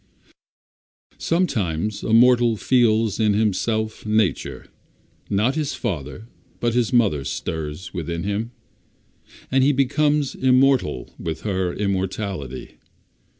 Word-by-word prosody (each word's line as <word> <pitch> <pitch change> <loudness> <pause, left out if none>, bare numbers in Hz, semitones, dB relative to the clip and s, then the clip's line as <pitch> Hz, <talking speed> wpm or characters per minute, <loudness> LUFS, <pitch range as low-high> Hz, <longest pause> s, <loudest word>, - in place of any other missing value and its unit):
Sometimes 105 - -1
a - - -3
mortal 120 -1 +5
feels 115 -3 +2
in 105 -2 +3
himself 110 +1 -1
Nature, 110 -3 0 0.6
not 105 +7 +1
his 150 -2 -2
Father 85 - -5 0.3
but 120 -1 0
his 120 -2 +1
Mother 105 - +2
stirs 80 +4 -5
within 85 0 -4
him, 105 +3 -2 1.0
and 130 0 +3
he 140 - +4
becomes 145 +1 +1
immortal 130 - +2
with 80 -1 -4
her 95 -4 -1
immortality. 95 - -4
110 Hz, 105 wpm, -22 LUFS, 95-125 Hz, 1.0 s, mortal